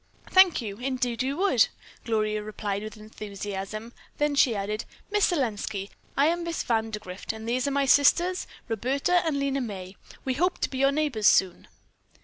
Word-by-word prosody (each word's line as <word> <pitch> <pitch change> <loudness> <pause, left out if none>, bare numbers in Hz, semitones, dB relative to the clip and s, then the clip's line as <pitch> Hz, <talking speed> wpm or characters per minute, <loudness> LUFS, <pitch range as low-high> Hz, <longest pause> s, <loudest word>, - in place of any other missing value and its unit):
"Thank 375 -8 +6
you. 200 -2 -5
Indeed 250 -1 -1
we 260 +1 0
would," 360 - +4 0.4
Gloria 215 -2 0
replied 210 -1 -3
with 215 0 -7
enthusiasm; 210 +1 -6 0.2
then 295 0 +1
she 260 -5 +4
added, 210 +2 -2 0.3
"Miss 415 -1 +4
Selenski, 220 - -2 0.3
I 280 - +5
am 340 +2 +1
Miss 335 -1 -2
Vandergrift, 220 -5 -2
and 220 0 -8
these 250 +3 0
are - - +2
my 280 0 +1
sisters, 345 +7 +4 0.2
Roberta 270 - +1
and 315 -3 0
Lena 275 -1 0
May. 190 -5 -6 0.3
We 260 - +1
hope 355 +7 +1
to - - 0
be 260 - -4
your 275 +1 +4
neighbors 280 -8 +1
soon." 185 -2 +3
240 Hz, 165 wpm, -27 LUFS, 215-280 Hz, 0.4 s, Thank